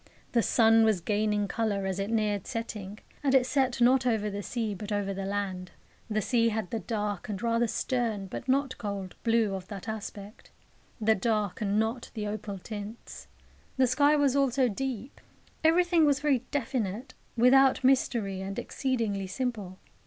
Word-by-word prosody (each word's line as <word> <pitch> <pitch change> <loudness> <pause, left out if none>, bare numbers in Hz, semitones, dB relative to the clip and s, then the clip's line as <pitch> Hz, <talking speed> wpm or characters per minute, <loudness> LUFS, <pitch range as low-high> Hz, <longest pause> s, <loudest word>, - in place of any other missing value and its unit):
The 235 - +3
sun 225 0 +5
was 220 -4 +3
gaining 210 +2 0
colour 205 -3 -1
as 190 0 -2
it 195 +1 -2
neared 210 -3 0
setting, 215 -4 -5 0.3
and 270 -1 +3
it 255 -2 +5
set 260 -2 +1
not 255 +1 +4
over 215 -3 0
the 200 +1 -4
sea, 225 0 -3
but 205 +2 -7
over 200 -1 -1
the 195 0 -4
land. 195 -2 -3 0.4
The 215 -1 0
sea 230 +1 +2
had 220 -4 -3
the 225 - -1
dark 210 -4 -3
and 200 -3 -3
rather 235 +1 +1
stern, 225 -4 -1
but 190 - -7
not 270 0 +1
cold, 200 -3 -4
blue 225 -3 +2
of 190 -1 -5
that 200 0 -8
aspect 210 -1 -7 0.5
the 220 0 +4
dark 210 -1 -1
and 205 0 +1
not 225 +2 -2
the 215 -1 -3
opal 205 -1 -4
tints. 210 +3 -8 0.5
The 260 - +5
sky 285 +4 +4
was 285 -3 +2
also 270 -2 +3
deep. 250 +2 -4 0.4
Everything 340 +1 +4
was 285 -2 +3
very 270 -4 +1
definite, 255 -3 -2 0.2
without 265 +3 +5
mystery, 235 -7 +2
and 195 +1 -5
exceedingly 225 -7 -2
simple. 210 -5 -4
220 Hz, 165 wpm, -28 LUFS, 205-255 Hz, 0.5 s, sun